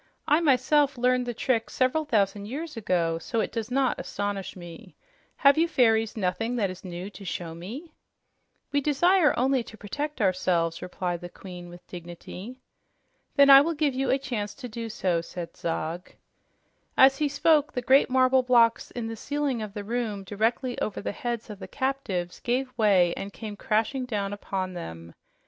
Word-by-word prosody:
"I 300 - +5
myself 285 -1 +3
learned 250 0 +2
the 240 - -2
trick 230 -1 0
several 265 +5 +1
thousand 205 -5 0
years 300 +6 -5
ago, 170 -6 0
so 230 +6 -2
it - - -1
does 230 -1 -4
not 265 0 +1
astonish 205 -1 -4
me. 175 -2 -11 0.4
Have 280 +2 +5
you 335 - +4
fairies 225 -7 +2
nothing 220 +5 -1
that 200 -6 0
is 185 0 -11
new 180 +2 -6
to 200 - -11
show 170 -3 -4
me?" 240 - -8 0.8
"We 285 - +2
desire 310 +4 +3
only 260 +1 +2
to 225 -1 -11
protect 290 +9 -5
ourselves," 180 -4 +1
replied 180 -1 -3
the 175 - -7
Queen 180 -1 -10
with 175 +1 -13
dignity. 180 +6 -9 0.8
"Then 280 -1 +7
I 275 0 +11
will 330 +3 -1
give 295 -2 +1
you 270 +1 -1
a 265 - +4
chance 240 -7 -4
to 255 - -7
do 230 0 -6
so," 180 -5 0
said 170 0 -8
Zog. 165 +1 -3 0.9
As 270 +1 +6
he 300 -1 +1
spoke, 300 +2 +3
the 250 - -3
great 270 +3 +5
marble 260 0 +4
blocks 235 -2 +3
in 240 -2 -5
the 225 0 -4
ceiling 285 0 -2
of 210 -2 -6
the 205 - -4
room 220 -2 -3
directly 225 +6 -1
over 210 - -2
the - - -3
heads 235 +2 -4
of 205 - -9
the - - -8
captives 245 -11 -3
gave 255 +1 -1
way 195 -6 +4
and 200 - -6
came 215 -2 -7
crashing 225 +6 0
down 205 -4 -2
upon 190 -2 -4
them. 80 - -8
225 Hz, 180 wpm, -27 LUFS, 185-265 Hz, 0.9 s, I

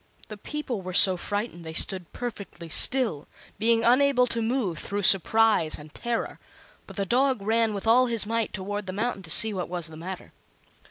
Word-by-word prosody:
The 215 - -8
people 255 -2 -6
were 185 -1 -7
so 190 -1 +7
frightened 205 -1 -5
they 160 0 -8
stood 180 +1 0
perfectly 200 -8 -8
still, 220 - 0 0.3
being 225 +1 +2
unable 250 +1 +3
to 235 -1 -4
move 225 -8 -2
through 205 +1 -4
surprise 205 -2 +3
and 150 0 -14
terror; 235 -1 -4 0.5
but - - -12
the 200 - -2
dog 255 +3 +1
ran 225 0 0
with 200 - -6
all 250 +3 +4
his 230 -3 0
might 230 0 -2
toward 205 +1 -5
the 185 - -5
mountain 215 0 -3
to 170 - -11
see 220 +6 +7
what 180 -3 -5
was 175 -2 -3
the 160 - -12
matter. 185 +3 -9
210 Hz, 185 wpm, -25 LUFS, 185-235 Hz, 0.5 s, so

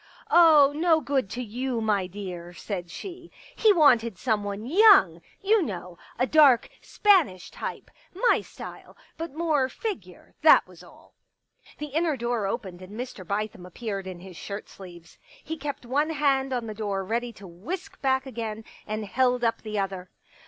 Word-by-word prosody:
" - - -25
Oh, 310 -5 +7
no 325 0 +3
good 265 -6 -1
to 250 +4 -4
you, 245 +2 -3
my 210 -4 0
dear," 180 -2 -8
said 175 -1 -6
she. 350 - -9
" - - -21
He 440 - +5
wanted 240 - +4
someone 205 -2 -2
young, 330 - +6 0.2
you 425 +2 +4
know 180 - -6
— - - -24
a 255 - +2
dark 275 -5 +5
Spanish 345 - +2
type - - -7 0.2
— - - -38 0.2
my - - +4
style, - - -11 0.2
but 330 -3 -7
more 310 -5 +1
figure, 430 - -7
that - - +6
was - - -16
all." - - -19 0.6
The 300 -2 -7
inner 320 -2 +1
door 235 -4 -1
opened 195 -5 -5
and 200 +5 -10
Mr. 245 -6 -6
Bithem 200 0 -4
appeared 195 +1 -6
in 180 -2 -8
his 185 -1 -11
shirt 200 +5 -7
sleeves. 175 -3 -13 0.2
He 320 - -5
kept 285 -3 -6
one 285 +6 0
hand 275 -3 +1
on 245 -2 -2
the 215 - -5
door 200 -2 -3
ready 235 +4 -2
to 200 -2 -13
whisk 350 - -7
back 265 0 +1
again, 225 -4 -5 0.2
and 215 0 -3
held 250 +2 +1
up 230 -1 0
the 215 -1 -5
other. 190 -2 -3
235 Hz, 175 wpm, -26 LUFS, 195-295 Hz, 0.6 s, Oh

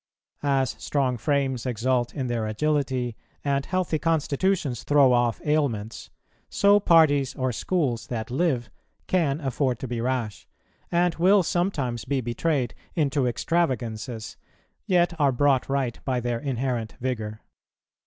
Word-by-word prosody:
As 135 -3 +1
strong 135 -3 0
frames 135 -1 -1
exult 120 +1 0
in 135 - -2
their 120 -3 -1
agility, 130 0 -1 0.3
and 140 -1 +1
healthy 185 -4 0
constitutions 160 - 0
throw 140 -3 +5
off 120 -2 +2
ailments, 130 -8 -1 0.4
so 200 +1 +4
parties 155 -8 +4
or 130 -1 -1
schools 125 - -1
that 115 -1 -4
live 130 -5 0 0.3
can 160 -6 +1
afford 135 -3 -1
to 130 - -6
be 120 -1 -3
rash, 120 -4 -2 0.4
and 175 0 +2
will 190 +3 +5
sometimes 155 - -1
be 135 +1 0
betrayed 125 +1 -1 0.2
into 140 -4 +1
extravagances, 120 -5 -2 0.5
yet 175 -1 +3
are 140 -2 +4
brought 135 +1 +2
right 135 -4 -1
by 130 -2 0
their 120 -1 -2
inherent 125 -4 -2
vigour. 110 -4 -3
130 Hz, 130 wpm, -25 LUFS, 120-150 Hz, 0.5 s, throw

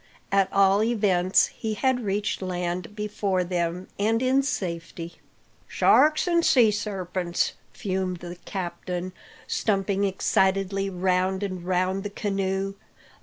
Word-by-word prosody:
At 195 -1 +3
all 195 +1 +4
events, 200 -5 +3
he 220 -1 -4
had 260 +2 +1
reached 205 0 -1
land 180 +1 -3
before 205 -3 -1
them, 175 0 -2
and 220 +2 +2
in 260 +2 +3
safety. 170 -8 -4 0.5
"Sharks 305 +3 +4
an' 340 -1 +3
sea 240 -9 +5
sarpents!" 185 -4 -2 0.2
fumed 185 -2 -2
the 175 +1 -8
captain, 180 -1 -4 0.3
Stumping 200 -1 0
excitedly 195 0 +1
round 185 +1 0
and 185 -3 -4
round 185 +1 0
the 205 - -4
canoe. 195 -1 -2
195 Hz, 120 wpm, -25 LUFS, 180-205 Hz, 0.5 s, sea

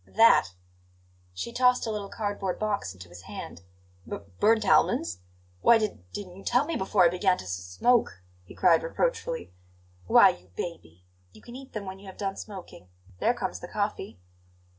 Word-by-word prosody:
"That!" 225 - +5 0.8
She 90 - -6
tossed 250 0 +3
a 225 - -2
little 205 -2 -4
cardboard 205 -3 -3
box 205 - -2
into 90 -1 -12
his 90 0 -12
hand. 95 -2 -9 0.5
"B - - -3 0.2
burnt 220 +1 +3
almonds! 85 +2 +3 0.4
Why 235 - +7
d 215 -2 -2
didn't 185 -3 -7
you 195 - -12
tell 250 +4 +2
me 330 - -3
before 190 -3 +3
I - - +6
began 180 +1 +2
to - - -8
s 90 - -6
smoke?" 90 - +1 0.2
he 90 - -14
cried 170 -3 +4
reproachfully. - - -2 0.5
"Why, - - +8
you 90 +1 -7
baby! 90 - -7 0.3
you - - -17
can 240 - -11
eat 265 0 -11
them 215 -2 -5
when 190 0 -7
you 200 - -13
have 190 - -10
done 195 -1 -3
smoking. 190 - -10 0.3
There - - +2
comes - - -4
the - - -8
coffee." - - -3
195 Hz, 180 wpm, -27 LUFS, -, 0.8 s, Why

